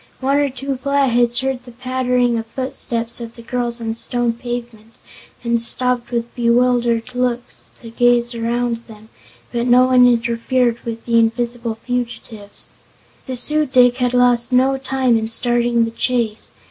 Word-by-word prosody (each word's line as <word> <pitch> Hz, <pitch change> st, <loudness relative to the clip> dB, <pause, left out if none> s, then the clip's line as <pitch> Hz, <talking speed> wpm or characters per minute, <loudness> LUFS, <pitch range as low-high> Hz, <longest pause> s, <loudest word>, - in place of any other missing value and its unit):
One 275 Hz, +2 st, +1 dB
or 290 Hz, -1 st, +1 dB
two 270 Hz, +1 st, -5 dB
Flatheads 250 Hz, -3 st, +2 dB
heard 265 Hz, -1 st, -2 dB
the 250 Hz, -, -13 dB
pattering 250 Hz, -1 st, 0 dB
of 225 Hz, -, -7 dB
footsteps 240 Hz, -2 st, -1 dB
of 230 Hz, 0 st, -8 dB
the 235 Hz, -, -12 dB
girls 240 Hz, 0 st, -2 dB
on 230 Hz, -1 st, -4 dB
the 225 Hz, -, -3 dB
stone 240 Hz, 0 st, -1 dB
pavement 235 Hz, -2 st, -7 dB, 0.5 s
and 235 Hz, -1 st, 0 dB
stopped 250 Hz, +1 st, +3 dB
with 235 Hz, -1 st, -3 dB
bewildered 240 Hz, 0 st, +1 dB
looks 250 Hz, -1 st, -3 dB
to 230 Hz, -, -10 dB
gaze 240 Hz, 0 st, +2 dB
around 235 Hz, +1 st, -1 dB
them, 220 Hz, -1 st, -15 dB, 0.4 s
but 240 Hz, +1 st, -2 dB
no 250 Hz, +1 st, +5 dB
one 250 Hz, -1 st, +5 dB
interfered 235 Hz, +1 st, 0 dB
with 230 Hz, -1 st, -6 dB
the 230 Hz, -1 st, +3 dB
invisible 235 Hz, 0 st, -1 dB
fugitives. 235 Hz, -4 st, -3 dB, 0.5 s
The 260 Hz, -, -4 dB
Su 300 Hz, +5 st, +1 dB
dic 250 Hz, -1 st, +4 dB
had 250 Hz, -1 st, 0 dB
lost 245 Hz, -1 st, +3 dB
no 260 Hz, +2 st, +3 dB
time 260 Hz, -3 st, +1 dB
in 220 Hz, -, -3 dB
starting 240 Hz, 0 st, +1 dB
the 225 Hz, -, -5 dB
chase. 230 Hz, -2 st, -2 dB
240 Hz, 160 wpm, -18 LUFS, 235-250 Hz, 0.5 s, no